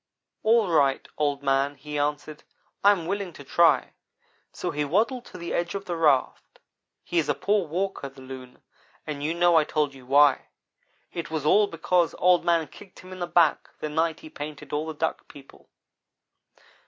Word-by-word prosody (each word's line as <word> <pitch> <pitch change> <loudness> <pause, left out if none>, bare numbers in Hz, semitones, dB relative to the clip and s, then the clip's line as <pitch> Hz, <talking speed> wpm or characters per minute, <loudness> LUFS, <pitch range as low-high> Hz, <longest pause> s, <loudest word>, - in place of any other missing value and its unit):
"'All 225 -1 +3
right, 140 -5 +2
Old 145 -1 -1
man,' 135 +1 +1
he 150 0 -6
answered, 150 +1 -3 0.4
'I 200 - +8
am 180 -5 -1
willing 200 0 -3
to 145 - -11
try'; 150 -1 +3 0.6
so - - -4
he 150 0 -1
waddled 225 - 0
to - - -11
the 170 -1 -5
edge 175 +2 -2
of 200 0 -5
the 175 - -3
raft. 150 -5 +1 0.5
He 175 - 0
is 160 - -1
a - - +2
poor 200 -4 0
walker 180 -3 -3
the 135 0 -17
Loon, 130 -1 -11 0.4
and 150 -2 -5
you 160 +3 -1
know 175 -1 +4
I 155 - +5
told 150 -2 -1
you 130 -2 -15
why. 145 +1 +4 0.7
It 170 - -5
was 155 -2 -3
all 205 +6 +5
because 170 -1 0
Old 180 -1 +4
man 170 -2 +2
kicked 195 -2 -15
him 185 - -13
in 185 - -10
the 175 - -3
back 170 -2 +2
the 155 - -4
night 160 +1 -1
he 155 - -11
painted 145 -1 -8
all 150 +2 -1
the 160 - -5
Duck 160 +2 -3
people. 140 -1 -16
160 Hz, 190 wpm, -26 LUFS, 145-175 Hz, 0.7 s, I